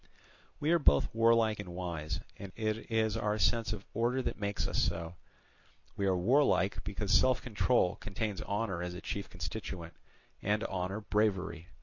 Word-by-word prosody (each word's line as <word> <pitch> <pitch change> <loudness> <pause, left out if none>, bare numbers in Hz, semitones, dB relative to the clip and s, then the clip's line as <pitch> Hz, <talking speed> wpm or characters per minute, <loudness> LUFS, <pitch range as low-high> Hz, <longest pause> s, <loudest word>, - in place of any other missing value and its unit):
We 150 - +1
are 170 - +5
both - - +3
warlike 115 -1 +4
and 90 -4 -6
wise, 85 -4 -3
and 100 -1 -8
it 110 0 -2
is 110 -1 +1
our 105 -1 0
sense 110 +4 +2
of 105 -2 -5
order 120 +3 +1
that - - -3
makes 100 0 -1
us - - 0
so. 85 -2 -1 0.8
We 100 - 0
are 95 -1 +3
warlike, 100 -1 +3
because 105 0 -3
self 130 +4 +5
control 115 -4 +1
contains 105 0 -3
honour 100 -4 -2
as 90 0 -4
a 90 - -7
chief 100 - -4
constituent, 90 -1 -6 0.5
and 105 +2 +1
honour 95 0 -2
bravery. 95 -6 0
105 Hz, 160 wpm, -32 LUFS, 90-110 Hz, 0.8 s, are